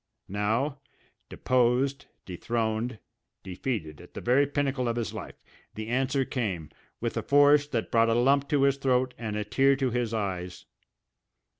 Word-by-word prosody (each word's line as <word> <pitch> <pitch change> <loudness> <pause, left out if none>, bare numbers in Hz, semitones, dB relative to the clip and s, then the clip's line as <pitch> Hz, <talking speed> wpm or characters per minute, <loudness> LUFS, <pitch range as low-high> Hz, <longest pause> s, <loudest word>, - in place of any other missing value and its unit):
Now, 110 +8 -1 0.5
deposed, 130 +2 +1 0.2
dethroned, 110 +5 -2 0.5
defeated 90 - -4
at - - -16
the - - -4
very 135 +4 +3
pinnacle 140 -3 -1
of 115 - 0
his 120 -3 -3
life, - - -7 0.4
the 110 +1 -5
answer 135 +2 +1
came, 95 - -3 0.3
with - - -3
a - - 0
force 145 +1 +5
that 120 -6 -3
brought 115 0 +4
a 115 - +2
lump 135 +3 +3
to 145 -3 +2
his 140 0 +3
throat 130 -2 +1
and 110 -2 -4
a 105 - -1
tear 135 +6 +3
to 135 -2 -1
his 120 -1 -1
eyes. 95 -5 -4
125 Hz, 155 wpm, -27 LUFS, 110-135 Hz, 0.5 s, force